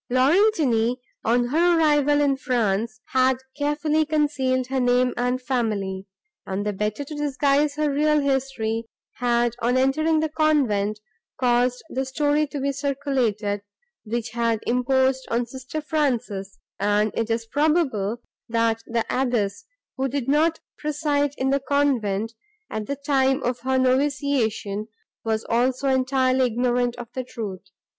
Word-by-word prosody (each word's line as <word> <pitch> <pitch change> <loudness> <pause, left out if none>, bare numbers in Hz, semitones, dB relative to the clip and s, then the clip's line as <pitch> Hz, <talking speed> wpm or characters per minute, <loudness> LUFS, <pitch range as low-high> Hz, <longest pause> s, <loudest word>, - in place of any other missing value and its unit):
Laurentini, 255 - +3 0.3
on 240 +1 +2
her 340 +4 +3
arrival 295 -2 +3
in 280 -2 +3
France, 225 -4 -1
had 260 0 +3 0.2
carefully 300 +1 +1
concealed 290 -4 0
her 265 +1 -2
name 250 0 +2
and 250 +1 0
family, 210 -7 -2 0.4
and, 195 +2 -3
the 210 - -1
better 210 +7 -2
to 285 - -9
disguise 290 0 +1
her 305 0 +1
real 300 +1 +3
history, 265 -5 -1 0.3
had, 240 -1 +1
on 245 +2 +2
entering 310 +5 +2
the 315 - +1
convent, 255 -10 +1 0.4
caused 245 0 +2
the 265 - -2
story 290 +3 +1
to 285 0 -5
be 280 +1 0
circulated, 260 -8 -1 0.4
which 230 +1 -3
had 230 -1 0
imposed 260 +2 +1
on 235 +1 0
sister 260 +5 -6
Frances, 245 -11 -2 0.2
and 205 +1 +2
it 230 0 -2
is 225 0 -1
probable, 260 - 0 0.3
that 230 -1 +1
the 230 -1 -1
abbess, 225 -6 -1 0.3
who 265 +1 0
did 270 -1 -3
not 315 +3 +2 0.2
preside 290 -1 0
in 265 +1 0
the 275 - +2
convent, 245 -7 0 0.4
at 215 -1 -4
the 280 - -2
time 275 -1 +1
of 245 0 -1
her 260 +1 0
noviciation, 255 -6 0 0.4
was 220 -1 -1
also 255 +3 +1
entirely 260 0 +2
ignorant 245 +1 0
of 240 -1 -8
the 260 - -3
truth. 215 -7 -6
255 Hz, 140 wpm, -24 LUFS, 230-285 Hz, 0.4 s, Laurentini